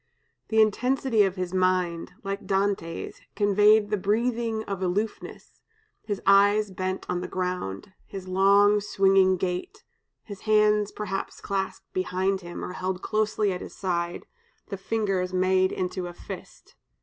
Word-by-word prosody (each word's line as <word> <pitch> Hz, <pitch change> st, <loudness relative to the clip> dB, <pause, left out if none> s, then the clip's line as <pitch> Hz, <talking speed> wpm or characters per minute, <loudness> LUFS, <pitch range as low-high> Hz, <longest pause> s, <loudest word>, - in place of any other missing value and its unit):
The 220 Hz, -, +1 dB
intensity 235 Hz, +2 st, +2 dB
of 190 Hz, -1 st, -2 dB
his 185 Hz, -1 st, -4 dB
mind, 185 Hz, -2 st, 0 dB
like 195 Hz, +1 st, -5 dB
Dante's, 195 Hz, -4 st, -2 dB
conveyed 205 Hz, +1 st, +4 dB
the 210 Hz, -, +2 dB
breathing 225 Hz, +2 st, 0 dB
of 195 Hz, -3 st, -5 dB
aloofness, 200 Hz, +4 st, -4 dB, 0.4 s
his 205 Hz, -3 st, -4 dB
eyes 205 Hz, +1 st, +5 dB
bent 185 Hz, 0 st, -3 dB
on 180 Hz, 0 st, -2 dB
the -, -, -4 dB
ground, 180 Hz, -, -4 dB
his 190 Hz, -1 st, -8 dB
long 200 Hz, +2 st, +4 dB
swinging 195 Hz, -2 st, +3 dB
gait, 185 Hz, -, -4 dB, 0.4 s
his 200 Hz, -3 st, -10 dB
hands 210 Hz, -1 st, +4 dB
perhaps 195 Hz, -2 st, -5 dB
clasped 195 Hz, -1 st, -4 dB
behind 185 Hz, +1 st, -1 dB
him, 175 Hz, -1 st, -7 dB
or 180 Hz, -, -6 dB
held 185 Hz, 0 st, -3 dB
closely 215 Hz, -2 st, 0 dB
at 180 Hz, -, -6 dB
his -, -, -9 dB
side, 175 Hz, -2 st, -2 dB, 0.4 s
the 195 Hz, -, -3 dB
fingers 195 Hz, -2 st, -1 dB
made 185 Hz, 0 st, +3 dB
into 180 Hz, 0 st, -3 dB
a 175 Hz, -, -8 dB
fist." -, -, -10 dB
195 Hz, 140 wpm, -26 LUFS, 185-210 Hz, 0.4 s, eyes